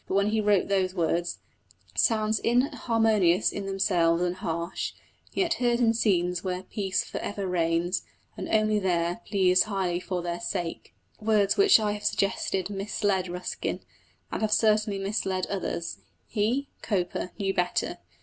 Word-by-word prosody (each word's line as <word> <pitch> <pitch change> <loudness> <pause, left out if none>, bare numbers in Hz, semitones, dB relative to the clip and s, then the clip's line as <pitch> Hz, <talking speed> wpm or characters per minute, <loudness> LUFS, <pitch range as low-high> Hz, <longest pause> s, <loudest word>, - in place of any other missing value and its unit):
But - - -2
when 200 +1 +3
he 220 0 +1
wrote 205 -3 +3
those 190 -2 +1
words 170 0 0 0.6
Sounds 215 -1 +2
inharmonious 225 - +2
in 200 -1 -5
themselves, 175 -3 +2
and 180 0 0
harsh, 170 -2 -3 0.4
Yet 350 -3 +1
heard 240 -1 +2
in 230 -2 +4
scenes 180 -6 +1
where 185 -1 -3
peace 190 -1 -1
for - - -6
ever 205 -1 -4
reigns, 170 0 +1 0.3
And - - -6
only 215 -1 +3
there, 175 +1 0
please 185 -3 +4
highly 190 -4 -1
for 180 -1 -3
their 175 0 -3
sake 175 -1 -4 0.2
words 210 -2 +2
which 400 - +6
I 210 -1 0
have 210 0 -5
suggested 195 -1 0
misled 195 -1 -1
Ruskin, 180 +1 -4 0.5
and - - -3
have 215 -1 0
certainly 215 -2 +3
misled 195 -2 -1
others 170 - -3 0.3
he, 235 +6 0
Cowper, 180 -3 -2
knew 195 -2 0
better. 180 -1 -1
195 Hz, 150 wpm, -27 LUFS, 180-215 Hz, 0.6 s, which